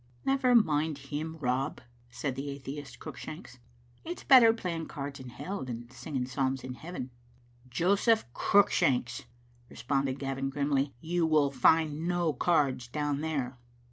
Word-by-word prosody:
"Never 265 Hz, -2 st, +3 dB
mind 155 Hz, -8 st, +3 dB
him, 150 Hz, +3 st, -5 dB
Rob," 135 Hz, +1 st, -1 dB, 0.3 s
said 125 Hz, +3 st, -3 dB
the 135 Hz, +2 st, -5 dB
atheist, 140 Hz, +1 st, -7 dB
Cruick 155 Hz, -5 st, -9 dB
shanks, 155 Hz, -5 st, -9 dB, 0.2 s
" 120 Hz, 0 st, -32 dB
it's 345 Hz, +2 st, -6 dB
better 250 Hz, -5 st, +8 dB
playing 175 Hz, -7 st, -4 dB
cards 140 Hz, -2 st, -6 dB
in 130 Hz, -1 st, -9 dB
hell 195 Hz, +9 st, -5 dB
than 120 Hz, -1 st, -7 dB
singing 130 Hz, 0 st, -4 dB
psalms 130 Hz, 0 st, -1 dB
in 130 Hz, -, -5 dB
heaven. 145 Hz, -2 st, -7 dB, 0.3 s
" 120 Hz, +1 st, -27 dB
"Joseph 200 Hz, +5 st, +3 dB
Cruickshanks," 130 Hz, -12 st, +2 dB, 0.4 s
responded 135 Hz, +2 st, -1 dB
Gavin 135 Hz, -1 st, -2 dB
grimly, 140 Hz, -1 st, 0 dB
"you 170 Hz, 0 st, 0 dB
will 150 Hz, -3 st, +3 dB
find 155 Hz, +4 st, +3 dB
no 175 Hz, -3 st, +1 dB
cards 140 Hz, -8 st, +1 dB
down 145 Hz, +2 st, -2 dB
there." 135 Hz, -6 st, -2 dB
140 Hz, 145 wpm, -30 LUFS, 130-160 Hz, 0.4 s, better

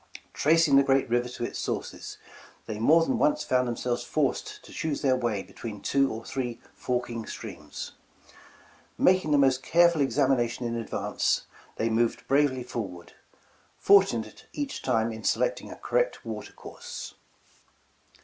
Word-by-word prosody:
Tracing 155 Hz, -2 st, +4 dB
the 140 Hz, -, +6 dB
great 135 Hz, 0 st, +2 dB
river 120 Hz, +1 st, +1 dB
to 125 Hz, -, -6 dB
its -, -, -4 dB
sources, -, -, -4 dB, 0.5 s
they 105 Hz, -1 st, -5 dB
more 160 Hz, +8 st, +5 dB
than 245 Hz, +3 st, 0 dB
once 300 Hz, 0 st, +2 dB
found 125 Hz, -1 st, +1 dB
themselves 120 Hz, 0 st, -2 dB
forced -, -, -2 dB
to -, -, -13 dB
choose 155 Hz, -2 st, -3 dB
their 130 Hz, -2 st, +4 dB
way 115 Hz, -6 st, -1 dB
between 110 Hz, -3 st, -8 dB
two 135 Hz, +6 st, +1 dB
or 110 Hz, +1 st, -6 dB
three 125 Hz, -3 st, -4 dB
forking 120 Hz, -2 st, -3 dB
streams. -, -, -7 dB, 1.1 s
Making 185 Hz, -4 st, +3 dB
the 145 Hz, -, +4 dB
most 135 Hz, -2 st, +3 dB
careful 170 Hz, +1 st, +4 dB
examination 130 Hz, -2 st, +1 dB
in 115 Hz, 0 st, -2 dB
advance, 115 Hz, -1 st, -1 dB, 0.3 s
they 110 Hz, -, 0 dB
moved 115 Hz, +1 st, 0 dB
bravely 135 Hz, -2 st, +2 dB
forward; 95 Hz, -8 st, -6 dB, 0.6 s
fortunate 190 Hz, -, +3 dB
each 290 Hz, -1 st, -4 dB
time 115 Hz, -3 st, +1 dB
in 110 Hz, 0 st, -8 dB
selecting -, -, 0 dB
a -, -, -7 dB
cor -, -, 0 dB
rect -, -, -2 dB
water -, -, -6 dB
course. -, -, -9 dB
130 Hz, 150 wpm, -27 LUFS, 115-150 Hz, 1.1 s, the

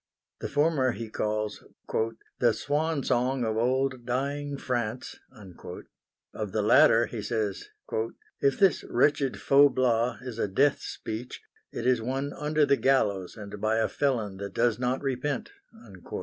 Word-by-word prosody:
The -, -, -4 dB
former 145 Hz, -4 st, +2 dB
he 115 Hz, -2 st, -7 dB
calls 105 Hz, -1 st, -2 dB, 0.8 s
"the 120 Hz, -2 st, +4 dB
swan 145 Hz, +2 st, -1 dB
song 125 Hz, 0 st, +1 dB
of 110 Hz, -1 st, -1 dB
old 130 Hz, +2 st, 0 dB
dying 140 Hz, +3 st, -2 dB
France"; 120 Hz, -2 st, -3 dB, 1.1 s
of -, -, -4 dB
the -, -, +1 dB
latter -, -, +6 dB
he -, -, -6 dB
says 105 Hz, -5 st, -2 dB, 0.7 s
"if 140 Hz, -1 st, +2 dB
this 195 Hz, -6 st, +3 dB
wretched 140 Hz, +1 st, +2 dB
Faublas 130 Hz, -4 st, +3 dB
is 125 Hz, -3 st, -6 dB
a -, -, +1 dB
death 135 Hz, +9 st, +2 dB
speech, 115 Hz, +3 st, -6 dB, 0.3 s
it 115 Hz, -, -5 dB
is 125 Hz, -2 st, +3 dB
one 135 Hz, +4 st, -2 dB
under 150 Hz, 0 st, +1 dB
the 140 Hz, -1 st, +3 dB
gallows, 100 Hz, -9 st, +1 dB
and 105 Hz, -1 st, -8 dB
by 110 Hz, +1 st, +2 dB
a 110 Hz, 0 st, +2 dB
felon 115 Hz, -9 st, -1 dB
that 100 Hz, -1 st, -7 dB
does 120 Hz, -1 st, +2 dB
not 125 Hz, +2 st, -1 dB
repent." 135 Hz, -, -2 dB
125 Hz, 140 wpm, -28 LUFS, 110-140 Hz, 1.1 s, latter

